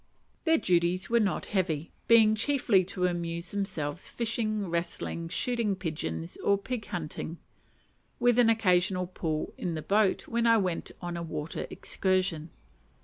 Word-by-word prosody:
Their 325 -1 +5
duties 180 - +1
were 235 - +5
not 205 -4 0
heavy; 170 -5 -1 0.2
being 225 -2 +7
chiefly 225 -4 +3
to 185 -1 -1
amuse 170 -1 -2
themselves 170 -6 -3
fishing, 215 -3 -1
wrestling, 170 0 -3
shooting 230 +1 0
pigeons, 85 - -4
or 200 - +2
pig 220 +2 -5
hunting, 165 0 -5 0.8
with 245 0 +4
an 235 -2 +6
occasional 185 -4 +3
pull 160 -4 -3
in 175 -2 -2
the 155 - -4
boat 205 -1 +2
when 235 0 +1
I 230 0 +6
went 185 -5 -1
on 175 0 -3
a - - -4
water 155 -1 -4
excursion. 185 -4 0
185 Hz, 145 wpm, -29 LUFS, 170-215 Hz, 0.8 s, being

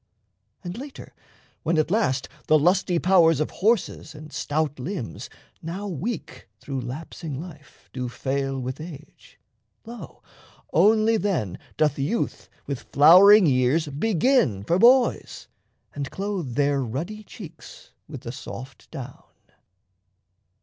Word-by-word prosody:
And 175 +5 -6
later, 280 0 -10 0.5
when 165 +1 0
at 155 +2 +1
last 140 - +1 0.2
The 155 - +6
lusty 175 +3 +2
powers 170 -4 +4
of 155 - -1
horses 210 -6 0
and 150 +1 -11
stout 150 -1 -2
limbs, 145 - -5 0.3
Now 185 +6 -5
weak 200 - -5
through 135 -2 -5
lapsing 140 +3 -6
life, 155 -4 -12
do 125 -2 -4
fail 135 +1 -2
with 130 +3 -5
age, 155 -2 -12 0.5
Lo, 235 +1 -10 0.5
only 220 +1 +4
then 175 - -2 0.2
doth 150 -2 +1
youth 160 +13 -2 0.2
with 140 -3 -4
flowering 185 +7 +8
years 140 +3 +2
Begin 165 - +1
for 170 - +1
boys, 245 +3 +3 0.5
and 140 -1 -4
clothe 190 - -4
their 140 0 +2
ruddy 160 - -5
cheeks 190 -8 -12 0.2
With - - -8
the - - -6
soft 65 - -10
down. - - -8
160 Hz, 120 wpm, -24 LUFS, 140-200 Hz, 0.5 s, flowering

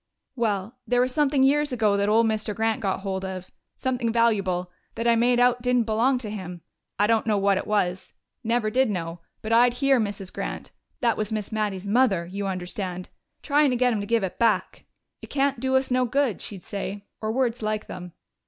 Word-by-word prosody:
"Well, 220 -1 -1
there 245 0 +2
was 250 +1 +1
something 285 -2 +2
years 295 +2 +3
ago 220 -5 +2
that 200 +1 +1
old 225 +2 +4
Mr. 215 -1 -1
Grant 225 0 0
got 195 -2 -1
hold 190 -1 -3
of 185 -1 -6 0.2
something 250 -3 -1
valuable 195 -6 +1 0.2
that 230 - -2
I 235 - +5
made 240 +1 +3
out 245 0 +3
didn't 250 -1 +2
belong 230 +4 +2
to 215 -4 -5
him. 180 -4 -7 0.4
I 205 - +3
don't 225 +1 +2
know 210 -2 +2
what 200 -1 +2
it - - -6
was 185 -3 0 0.3
never 230 -1 0
did 260 0 +2
know 170 -3 -4 0.2
but 220 +1 -1
I'd 240 +1 +5
hear 270 0 +3
Mrs. 200 -3 -4
Grant - - -5 0.3
that 235 -3 +2
was 215 0 -2
Miss 215 -1 -3
Mattie's 205 -3 -2
mother, 200 -5 +2
you 195 +3 -4
understand 185 0 -4 0.3
tryin' 290 0 +3
to 250 - 0
get 250 0 +3
him 215 - -1
to 200 - -5
give 230 -2 +2
it 190 - -4
back. 230 -2 +1 0.4
'It - - -9
can't 275 -3 0
do 265 +1 0
us 265 0 +1
no 255 0 +3
good,' 255 -3 0
she'd 195 -4 -8
say 200 0 -5 0.2
or 215 0 -1
words 240 -1 0
like 215 0 -2
them. 180 -2 -8
220 Hz, 210 wpm, -25 LUFS, 200-245 Hz, 0.4 s, I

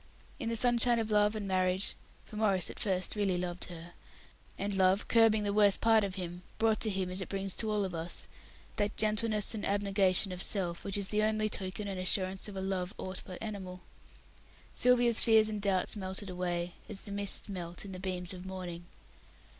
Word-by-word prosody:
In 230 -5 -2
the 230 - -1
sunshine 240 +1 +4
of 220 -1 -2
Love 210 0 +3
and 210 -2 -4
Marriage 185 0 +1 0.3
for - - -12
Maurice 200 -5 +2
at - - -12
first 185 -1 0
really 200 -3 +1
loved 175 0 -3
her; 170 0 -10 0.6
and 200 +1 -2
love, 190 +1 +3
curbing 225 -2 +4
the 200 -1 -1
worst 205 -1 +4
part 225 -1 +4
of 195 -2 -3
him, 175 -2 -6 0.2
brought 220 -1 +2
to 220 - +1
him, 190 -2 -2
as 185 +1 -3
it - - -6
brings 195 -1 -3
to 220 - 0
all 210 -2 +1
of 185 - -5
us, 165 +1 -4 0.5
that 205 0 0
gentleness 215 0 +1
and 215 - -5
abnegation 195 -1 +3
of 180 0 -5
self 175 -5 -1
which 200 0 -2
is 200 -1 0
the 210 0 +1
only 215 0 +1
token 195 +1 -2
and 195 -2 -4
assurance 185 +1 +1
of 205 - -8
a 190 - -3
love 190 -1 -2
aught 185 0 -4
but 185 -2 -7
animal 190 -4 -6 0.9
Sylvia's 245 -2 +4
fears 220 -1 +5
and 210 -1 -4
doubts 195 -1 +1
melted 190 0 -4
away, 175 -1 -2 0.2
as 205 -3 -5
the 205 - -9
mists 200 0 0
melt 175 -2 -6
in 195 - -8
the 185 - -7
beams 185 -1 -3
of 180 -1 -9
morning. 180 -2 -7
195 Hz, 200 wpm, -31 LUFS, 185-215 Hz, 0.9 s, fears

